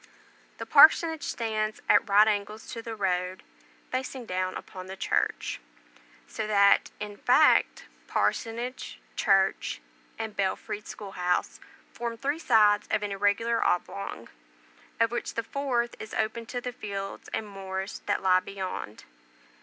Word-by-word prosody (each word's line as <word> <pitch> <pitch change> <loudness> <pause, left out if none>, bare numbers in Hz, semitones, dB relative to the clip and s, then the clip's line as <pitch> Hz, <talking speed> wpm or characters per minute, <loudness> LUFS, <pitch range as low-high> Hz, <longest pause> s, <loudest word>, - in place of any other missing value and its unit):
The - - -6
parsonage 320 -2 +6
stands 215 -4 -2
at 225 - +4
right 205 +2 +6
angles 210 +1 -2
to 230 - -5
the 225 -1 -6
road, 185 -2 -1 0.5
facing 255 -1 -3
down 185 -1 -2
upon 185 0 -8
the 190 - -7
church; - - -1 0.7
so 215 - -4
that, 200 -1 +4
in 210 -1 -6
fact, 295 +8 +4 0.2
parsonage, 240 +3 -2 0.2
church, 195 -2 +2 0.4
and 220 -2 -5
belfried 200 +1 -2
school 205 -2 -8
house, 180 -1 -1 0.3
form 235 -1 -4
three 285 +6 -2
sides 210 -8 +4
of 210 - 0
an 205 - -3
irregular 205 +4 +1
oblong, 100 - -2 0.7
of 230 0 +3
which 240 - -4
the 230 - -1
fourth 240 -2 -1
is 220 - -7
open 225 +1 -2
to 245 - -3
the 245 0 -5
fields 200 -3 -6
and 215 - -3
moors 195 0 -5
that 205 - 0
lie 185 -1 +5
beyond. 185 - -6
210 Hz, 140 wpm, -28 LUFS, 195-230 Hz, 0.7 s, parsonage